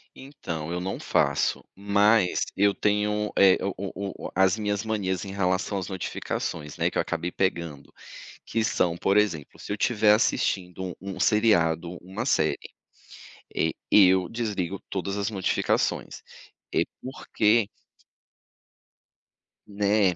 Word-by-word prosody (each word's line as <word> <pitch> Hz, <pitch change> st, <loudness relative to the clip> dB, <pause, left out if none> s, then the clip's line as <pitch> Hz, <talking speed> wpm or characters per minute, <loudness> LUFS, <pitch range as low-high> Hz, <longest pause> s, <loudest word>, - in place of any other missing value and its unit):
Então, 85 Hz, -, -6 dB
eu 90 Hz, -, -2 dB
não 95 Hz, +1 st, -4 dB
faço. -, -, +1 dB
Mas, 100 Hz, 0 st, +3 dB, 0.2 s
eu 100 Hz, 0 st, +4 dB
tenho, 105 Hz, 0 st, 0 dB
eh, 95 Hz, -1 st, +6 dB
o 100 Hz, -, -1 dB
o 100 Hz, +1 st, -6 dB
o -, -, -10 dB
as 95 Hz, +2 st, +3 dB
minhas 105 Hz, -1 st, -1 dB
manias 95 Hz, -4 st, -2 dB
em 95 Hz, -, -6 dB
relação 95 Hz, +1 st, 0 dB
às 95 Hz, -2 st, -4 dB
notificações, 80 Hz, -5 st, -4 dB
né, -, -, +1 dB
que -, -, -4 dB
eu -, -, +3 dB
acabei 90 Hz, +1 st, -3 dB
pegando. 85 Hz, -6 st, -2 dB, 0.5 s
Que 115 Hz, -, 0 dB
são, 85 Hz, -5 st, +1 dB
por 95 Hz, +3 st, +1 dB
exemplo, 90 Hz, -9 st, 0 dB
se -, -, -6 dB
eu -, -, -1 dB
tiver 105 Hz, 0 st, +3 dB
assistindo 95 Hz, -5 st, -1 dB
um 95 Hz, +1 st, -6 dB
um 90 Hz, -, -8 dB
seriado, 90 Hz, -6 st, +2 dB
uma 95 Hz, +6 st, -5 dB
série, 80 Hz, -, +2 dB, 1.0 s
eh, 80 Hz, -, +1 dB, 0.2 s
eu 95 Hz, -3 st, +6 dB
desligo 100 Hz, -5 st, -3 dB
todas 100 Hz, +1 st, -3 dB
as 100 Hz, +2 st, -1 dB
notificações. 95 Hz, -4 st, -1 dB, 0.5 s
Eh, -, -, +3 dB, 0.2 s
porque 115 Hz, -4 st, +1 dB, 2.0 s
Né. 100 Hz, -2 st, +2 dB
100 Hz, 135 wpm, -26 LUFS, 90-105 Hz, 2.0 s, eh